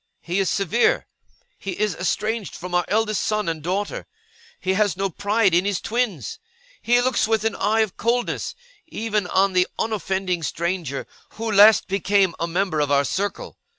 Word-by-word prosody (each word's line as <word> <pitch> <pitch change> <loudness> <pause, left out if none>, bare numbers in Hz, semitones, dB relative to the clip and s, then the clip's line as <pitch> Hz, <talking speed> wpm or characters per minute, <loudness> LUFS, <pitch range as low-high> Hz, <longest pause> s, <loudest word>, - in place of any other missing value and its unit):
He 175 +3 -2
is 195 - +1
severe. 200 +4 +2 0.5
He 195 -2 -5
is 210 -2 +1
estranged 210 +4 -2
from 180 +1 -7
our 175 0 +2
eldest 215 0 +1
son 215 -2 -1
and 165 -2 -2
daughter, 190 +6 -3 0.5
he 190 - 0
has 205 -2 +1
no 195 0 -1
pride 205 +1 +1
in 175 +2 +4
his 200 -2 -1
twins, 210 - -2 0.4
he 245 +1 +3
looks 245 -2 +1
with 220 -1 +1
an 225 - +1
eye 220 +2 +2
of 215 -4 -2
coldness 245 - -1 0.3
even 215 -4 -2
on 190 +1 +2
the 180 0 +3
unoffending 190 -5 -1
stranger 165 -1 -3 0.3
who 225 0 -3
last 210 +1 +7
became 195 -1 +2
a 170 - -1
member 180 -1 0
of 145 -1 +1
our 140 0 +3
circle. 200 +7 -3
195 Hz, 170 wpm, -23 LUFS, 180-215 Hz, 0.5 s, last